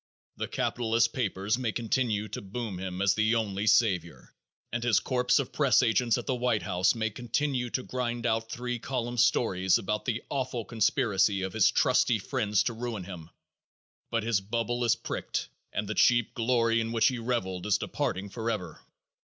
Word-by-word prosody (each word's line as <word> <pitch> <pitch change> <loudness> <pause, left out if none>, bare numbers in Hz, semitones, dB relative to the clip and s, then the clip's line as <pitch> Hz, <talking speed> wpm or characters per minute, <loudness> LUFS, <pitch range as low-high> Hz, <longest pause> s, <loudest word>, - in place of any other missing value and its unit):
The - - -3
capitalist 115 -1 0
papers 105 -1 -1
may 120 -4 -1
continue 110 -2 -1
to - - -5
boom 100 -1 -5
him 95 0 -3
as 100 - +4
the 110 +1 +2
only 105 -2 -1
savior 95 -7 +1 0.4
and 120 -1 -2
his 120 -3 +4
corps 125 -1 +1
of 135 - -3
press 135 -3 +4
agents 115 0 +2
at 120 - -5
the 135 - 0
White 125 -3 0
House 95 +3 +2
may 110 -1 -1
continue 125 +2 -1
to 130 - -2
grind 120 -2 -3
out 115 -1 0
three 125 0 -3
column 120 -1 -3
stories 95 -5 +3
about 105 +2 -3
the 120 -2 -2
awful 130 -4 -3
conspiracy 105 -4 +1
of 95 -1 -4
his 110 -3 +4
"trusty" - - +3
friends 105 -1 0
to 115 - -1
ruin 115 -3 -4
him, 85 -3 -9 0.8
but 115 -2 -1
his 110 -3 +1
bubble 115 +4 -2
is 120 0 +4
pricked 115 - -4 0.2
and - - -3
the - - -2
cheap 120 -2 +3
glory 115 -1 +2
in 115 0 -3
which 115 -1 +4
he 125 -2 -4
reveled 105 -6 -2
is 105 - +3
departing 95 +2 -3
forever. 100 -7 -4
115 Hz, 180 wpm, -28 LUFS, 100-120 Hz, 0.8 s, as